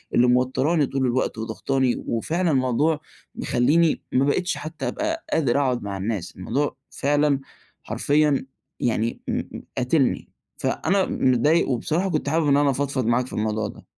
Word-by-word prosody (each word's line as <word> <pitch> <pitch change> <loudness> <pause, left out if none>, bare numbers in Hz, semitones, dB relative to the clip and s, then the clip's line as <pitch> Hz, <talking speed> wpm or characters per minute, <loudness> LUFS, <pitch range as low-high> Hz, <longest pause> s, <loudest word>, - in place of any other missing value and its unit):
اللي 125 +1 +5
موتراني 130 +5 +2
طول 135 0 -1
الوقت 125 0 0
وضاغطاني، 125 +3 -1
وفعلًا 165 +9 0
الموضوع 140 +4 +2 0.4
مخليني 155 +7 +2
ما 130 +2 +3
بقيتش 180 +6 0
حتى 155 +1 -5
أبقى 320 +1 -2
قادر 140 -5 +2
اقعد 125 -4 0
مع 100 -1 -4
الناس، 95 -3 -3
الموضوع 130 +10 -1
فعلًا 145 0 +1 0.4
حرفيًا 145 -2 +1 0.3
يعني 115 -1 -1
م - - -1 0.3
قاتلني. 130 +1 +1 0.3
فأنا 195 0 +1
متضايق، 130 +7 +2
وبصراحة 160 +9 0
كنت 155 -3 -1
حابب 160 0 +1
إن 140 0 +4
أنا 145 -1 +3
أفضفض 140 -2 -1
معاك 120 +2 +1
في - - -11
الموضوع 110 0 -1
ده. - - -12
135 Hz, 145 wpm, -24 LUFS, 120-155 Hz, 0.4 s, اللي